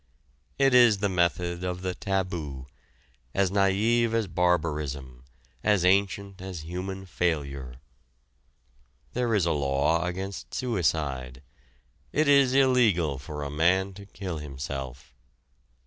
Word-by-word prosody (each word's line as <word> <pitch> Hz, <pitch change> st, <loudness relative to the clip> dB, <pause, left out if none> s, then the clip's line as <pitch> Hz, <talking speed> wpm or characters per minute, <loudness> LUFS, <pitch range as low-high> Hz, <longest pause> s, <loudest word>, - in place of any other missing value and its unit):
It 135 Hz, -1 st, +3 dB
is 120 Hz, -4 st, +7 dB
the 100 Hz, 0 st, 0 dB
method 85 Hz, 0 st, 0 dB
of 90 Hz, 0 st, -3 dB
the 90 Hz, -1 st, -1 dB
taboo, 85 Hz, -8 st, -3 dB, 0.7 s
as 95 Hz, -2 st, +2 dB
naïve 105 Hz, +4 st, +2 dB
as 115 Hz, -1 st, +1 dB
barbarism, 75 Hz, -8 st, -1 dB, 0.4 s
as 105 Hz, -4 st, +3 dB
ancient 100 Hz, 0 st, +1 dB
as 95 Hz, -3 st, -6 dB
human 95 Hz, +4 st, -5 dB
failure. 70 Hz, -8 st, -2 dB, 1.4 s
There 120 Hz, -2 st, +1 dB
is 95 Hz, -5 st, +2 dB
a 85 Hz, -, +1 dB
law 70 Hz, +3 st, +1 dB
against 95 Hz, +2 st, -5 dB
suicide. 75 Hz, -, -1 dB, 0.7 s
It 155 Hz, 0 st, +1 dB
is 140 Hz, -2 st, +5 dB
illegal 110 Hz, -, +3 dB
for 75 Hz, +2 st, -6 dB
a 70 Hz, -, -4 dB
man 95 Hz, +6 st, +2 dB
to 100 Hz, +1 st, -12 dB
kill 95 Hz, -5 st, -5 dB
himself. 65 Hz, -3 st, -7 dB
90 Hz, 115 wpm, -27 LUFS, 75-100 Hz, 1.4 s, is